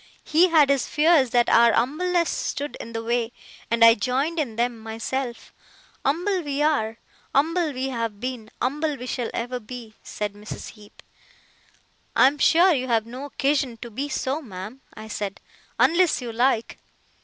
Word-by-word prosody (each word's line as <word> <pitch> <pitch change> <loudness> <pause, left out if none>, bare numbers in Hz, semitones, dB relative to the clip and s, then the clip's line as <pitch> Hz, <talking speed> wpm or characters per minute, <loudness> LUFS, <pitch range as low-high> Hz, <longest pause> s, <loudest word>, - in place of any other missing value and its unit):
He 340 +4 +4
had 305 -4 +5
his 275 -3 +1
fears 300 -4 +4
that 240 0 +3
our 235 -1 +5
umbleness 335 +8 +1
stood 290 +1 -3
in 230 - -8
the 225 0 -3
way, 235 0 0 0.4
and 230 0 +5
I 230 - +9
joined 265 +9 -1
in 250 -8 -2
them 235 0 -1
myself. 230 +2 -5 0.5
Umble 360 +7 +1
we 290 -2 -2
are, 230 -8 +1 0.4
umble 325 +3 +2
we 265 0 -3
have 230 -5 -3
been, 245 -2 -5
umble 295 +4 -1
we 250 - -7
shall 245 -2 -3
ever 245 +2 -3
be,' 235 -1 -9
said 210 -1 -4
Mrs. 210 +1 -8
Heep. 210 -2 -16 1.1
'I - - +6
am 285 +2 0
sure 350 +6 +5
you 260 -3 -1
have 225 -3 +1
no 250 +4 -7
occasion 275 -3 0
to 235 - -9
be 275 +7 -4
so, 270 +2 -2
ma'am,' 215 +1 -9
I 215 0 -9
said, 205 -2 -4 0.4
'unless 340 +1 +3
you 245 -3 -5
like. 235 0 0
255 Hz, 165 wpm, -24 LUFS, 230-295 Hz, 1.1 s, I